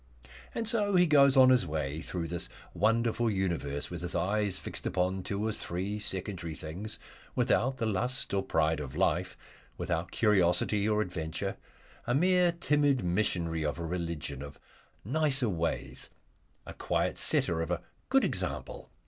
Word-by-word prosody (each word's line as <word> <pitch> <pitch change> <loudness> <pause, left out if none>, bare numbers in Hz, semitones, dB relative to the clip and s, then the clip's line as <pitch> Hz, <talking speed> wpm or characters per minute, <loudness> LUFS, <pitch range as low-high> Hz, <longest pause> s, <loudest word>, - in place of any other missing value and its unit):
And 230 - -2
so 210 -4 +1
he 180 0 +6
goes 140 -3 +5
on 130 -1 +8
his 125 -8 +4
way 75 -1 -2
through 85 0 -4
this 85 +1 -3 0.2
wonderful 115 +4 +2
universe 85 -8 -2
with 85 -2 -5
his 90 0 -3
eyes 100 +3 0
fixed - - -4
upon 95 +1 0
two 100 +3 -3
or 110 - +1
three 100 +2 -4
secondary 95 -5 -3
things, 90 +9 -6 0.4
without 130 +2 +2
the 115 - -1
lust 120 +5 -1
or 100 - +2
pride 80 -4 +1
of 70 -4 -6
life, - - +1 0.4
without 85 0 -2
curiosity 100 0 +2
or 105 0 +2
adventure, 80 -5 -4 0.5
a 120 - +2
mere 180 +3 +4
timid 145 -5 +2
missionary 85 -3 0
of 75 +1 -1
a 85 - -4
religion 80 -5 -4
of 70 0 -9 0.5
"Nicer 135 -1 +2
Ways," 85 -3 -2 0.6
a - - -8
quiet - - -1
setter 80 -1 +2
of 80 - -3
a 90 -1 -2 0.3
good 270 0 +4
example. - - -3
95 Hz, 155 wpm, -30 LUFS, 85-120 Hz, 0.6 s, on